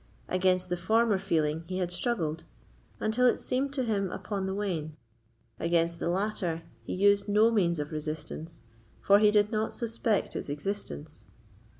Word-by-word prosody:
Against 185 0 +2
the 180 - -1
former 220 +2 +2
feeling 160 -4 0
he 185 - -3
had 180 -2 -1
struggled, 175 -5 -1 0.6
until 230 +4 +3
it - - +2
seemed 270 +2 0
to 265 -2 -1
him 200 -5 0
upon 195 -2 -3
the 190 - -2
wane; 165 -7 -3 0.6
against 170 0 +1
the - - -1
latter 180 -3 -1 0.2
he 115 - -5
used 200 +1 +3
no 215 +3 +5
means 175 -6 +2
of 150 +1 -4
resistance, 155 +1 -4 0.4
for 200 +1 +5
he 210 0 +6
did 210 0 +3
not 215 -1 0
suspect 230 -2 -1
its - - -4
existence. 155 -1 -5
190 Hz, 160 wpm, -29 LUFS, 165-215 Hz, 0.6 s, he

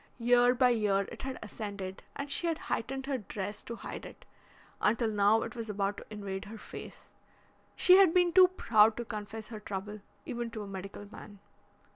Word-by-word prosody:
Year 245 +1 +4
by 250 0 +5
year 210 -4 +2
it - - -8
had 265 -1 -4
ascended 200 -3 -6
and 280 0 -5
she 340 - -1
had 330 -2 0
heightened 265 +3 -3
her 270 -2 -1
dress 205 0 -5
to 235 - -5
hide - - -7
it, - - -12 0.6
until 225 +1 +2
now 210 +2 +4
it 230 - -7
was 230 -2 -5
about 200 0 -1
to - - -9
invade 200 -2 -5
her 220 +2 -9
face. - - -10 0.6
She 365 0 +7
had 385 -4 +7
been 355 -1 +3
too 370 0 +9
proud 220 - +4
to 240 - -3
confess 215 0 -6
her 220 -2 -7
trouble, 210 +1 -6 0.2
even 240 -1 -3
to 220 -2 -6
a - - -8
medical 195 +1 -7
man." 205 - -11
220 Hz, 190 wpm, -31 LUFS, 205-245 Hz, 0.6 s, too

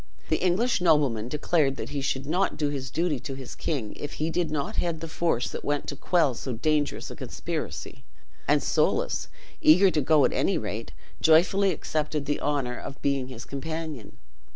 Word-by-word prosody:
The - - +1
English 185 +5 +2
nobleman 145 -10 +3
declared 150 -1 +1
that - - -5
he 140 - -3
should 135 0 -1
not 180 +7 0
do 150 -2 +1
his 135 -2 -4
duty 160 -2 0
to 135 +2 -6
his 130 -2 -8
king 135 -10 -3
if 145 +1 -6
he 160 +2 -1
did 170 -1 0
not 145 -2 -3
head 170 -2 0
the 165 - -5
force 155 -7 0
that - - -6
went 145 0 -1
to 140 - -4
quell 160 -2 +2
so 125 +2 -4
dangerous 150 +5 0
a - - -7
conspiracy; - - -5 0.4
and - - +3
Soulis, - - +1 0.3
eager 180 +5 +7
to 150 - +1
go 150 0 +5
at - - +1
any - - +2
rate, - - -4 0.3
joyfully 185 +5 +5
accepted 155 -3 -2
the 145 +1 -1
honor 135 -4 -1
of 140 - -8
being 140 -2 +1
his 125 -2 -8
companion. 155 - -5
150 Hz, 185 wpm, -27 LUFS, 135-165 Hz, 0.4 s, eager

